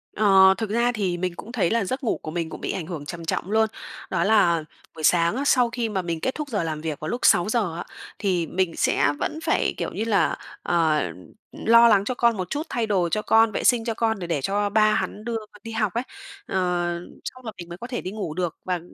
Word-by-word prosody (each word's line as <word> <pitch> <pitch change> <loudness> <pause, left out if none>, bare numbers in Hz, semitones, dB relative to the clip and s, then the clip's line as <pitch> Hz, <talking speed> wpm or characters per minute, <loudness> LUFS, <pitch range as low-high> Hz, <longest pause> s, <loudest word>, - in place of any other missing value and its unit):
Ờ, 190 -2 +6
thực 225 -2 -3
ra 235 +3 +2
thì 195 -6 -1
mình 180 0 -2
cũng 225 - -9
thấy 205 -9 +1
là 230 -3 +1
giấc 260 +7 -3
ngủ 225 - 0
của 155 - -6
mình 165 -1 -3
cũng - - -9
bị - - -2
ảnh 175 - -4
hưởng 155 -5 -6
trầm 170 +1 -7
trọng 175 +3 -2
luôn, 220 0 +3 0.4
đó 170 -2 0
là 175 -6 +3 0.3
buổi 155 - -8
sáng 170 +3 +3
á, 275 - -1
sau 250 -4 +4
khi 230 -1 -2
mà 195 -3 -1
mình 170 -2 -3
kết 260 - -1
thúc 300 -2 -5
giờ 205 -7 -1
làm 155 -2 -3
việc 155 -3 -4
vào 155 - -5
lúc 245 - -3
6:00 205 -1 +3
á, 170 - -4 0.4
thì 180 -5 0
mình 185 +1 0
sẽ - - +2
vẫn 310 - -2
phải, - - +1
kiểu - - -3
như 220 - -3
là, 210 -3 +2 0.3
ờ, 160 -3 +2 0.5
lo 230 +1 +5
lắng 200 -3 +4
cho 255 - -2
con 235 -3 +2
một 185 -1 -4
chút, 295 - -2
thay 235 -6 -1
đồ 180 -5 +1
cho 215 - 0
con, 225 0 +4
vệ - - -3
sinh 235 -2 +3
cho 230 - -1
con 220 -2 0
để 175 - -5
để 160 -5 -1
cho 205 +6 0
ba 215 +1 +4
hắn 210 - -3
đưa 235 -1 -1 0.3
đi 230 - -7
học 215 -4 -1
ấy. 235 - -1 0.4
Ờ, - - -5 0.7
xong 255 -1 -8
là 220 - -4
mình 175 0 -9
mới 175 - -7
có 240 - -7
thể 245 -2 -4
đi 185 - -5
ngủ 200 -8 -4
được, 175 -2 -3
và 180 -1 -1
205 Hz, 255 wpm, -24 LUFS, 175-230 Hz, 0.7 s, Ờ